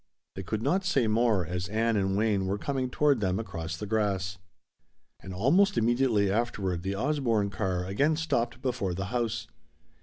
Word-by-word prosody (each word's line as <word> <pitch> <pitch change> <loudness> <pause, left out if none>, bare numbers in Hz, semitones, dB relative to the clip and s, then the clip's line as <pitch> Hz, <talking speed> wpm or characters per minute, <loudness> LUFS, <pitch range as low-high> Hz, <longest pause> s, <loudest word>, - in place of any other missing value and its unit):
They 95 - -6
could 105 +4 -3
not 190 +2 +1
say 145 -10 +2
more, 110 -4 +2
as 90 +2 -3
Ann 115 +2 +1
and 95 -1 +1
Wayne 105 -3 +1
were 100 +2 -1
coming 130 +2 -2
toward 145 -1 +2
them 95 -2 0
across 85 -6 -5
the 105 - -5
grass. 100 -3 -1 0.8
And 95 - -9
almost 170 - +3
immediately 115 -4 +2
afterward 100 -5 -1
the 95 +2 -3
Osborne 115 -5 0
car 95 -3 -2
again 140 +12 +1
stopped 130 -6 -1
before 120 -9 -1
the 95 +2 -3
house. 120 -3 -1
110 Hz, 170 wpm, -28 LUFS, 95-125 Hz, 0.8 s, almost